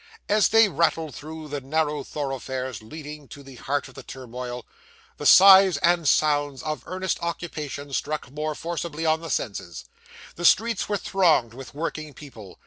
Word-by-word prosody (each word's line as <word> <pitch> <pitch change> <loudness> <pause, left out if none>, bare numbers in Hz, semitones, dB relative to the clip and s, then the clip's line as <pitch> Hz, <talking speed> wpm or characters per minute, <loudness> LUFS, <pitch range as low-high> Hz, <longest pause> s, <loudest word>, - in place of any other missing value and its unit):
As 210 0 +3
they 225 0 +6
rattled 160 -3 0
through 155 +1 -9
the 145 0 -4
narrow 150 +1 -1
thoroughfares 130 -5 -5
leading 150 +4 -10
to 140 - -12
the 135 -1 -13
heart 140 +4 -2
of 130 - -15
the - - -10
turmoil, 125 -1 -8 0.5
the - - -1
sights 190 -3 +8
and 170 -3 +3
sounds 145 -3 +1
of 155 -1 -3
earnest 185 0 -2
occupation 150 -4 -5
struck 150 -2 -3
more 150 +1 -3
forcibly 165 -1 -4
on 160 0 +2
the 165 - -7
senses. 90 - -4 0.5
The 175 - -3
streets 230 +3 +3
were 205 - +1
thronged 165 - +2
with 135 +2 -11
working 155 -2 -5
people. 115 -10 -12
150 Hz, 160 wpm, -24 LUFS, 135-165 Hz, 0.5 s, sights